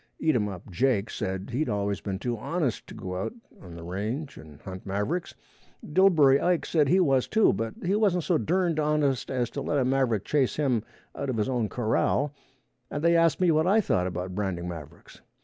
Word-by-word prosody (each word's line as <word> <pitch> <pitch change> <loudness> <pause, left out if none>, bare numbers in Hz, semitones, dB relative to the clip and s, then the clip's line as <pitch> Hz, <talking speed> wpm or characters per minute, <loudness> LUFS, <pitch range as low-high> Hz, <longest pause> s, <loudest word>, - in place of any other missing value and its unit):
Eatumup 105 - 0
Jake 115 +1 +1
said 95 +3 -4
he'd 145 +6 -1
always 100 -3 -1
been 95 -2 -3
too 120 +4 -2
honest 140 +3 -2
to - - -10
go 90 0 -5
out - - -3 0.3
on 90 -3 -11
the 85 - -9
range 110 - -4
and 75 -2 -13
hunt 95 0 -8
mavericks; 105 - -2 0.5
Dillbery 150 -6 +5
Ike 175 -2 +1
said 150 -4 +2
he 185 - +4
was 135 -8 +3
too, 220 0 +4
but 115 0 -3
he 185 - +1
wasn't 200 -5 +2
so 170 -2 +1
durned 175 -2 +1
honest 150 -3 +1
as 125 -3 -1
to - - -4
let 145 - -1
a 130 - +2
maverick 125 -6 +1
chase 140 -4 +1
him 130 -7 +1 0.3
out 140 - -4
of 125 - -1
his 105 - 0
own 120 -5 -1
corral, 125 +5 0 0.6
and 145 - -4
they 170 0 +4
asked 165 -1 +3
me 180 -2 +4
what 155 +2 +2
I 205 +4 +5
thought 90 - +1
about 90 +1 -4
branding 90 -3 -3
mavericks. 80 -2 -10
130 Hz, 200 wpm, -27 LUFS, 100-155 Hz, 0.6 s, Dillbery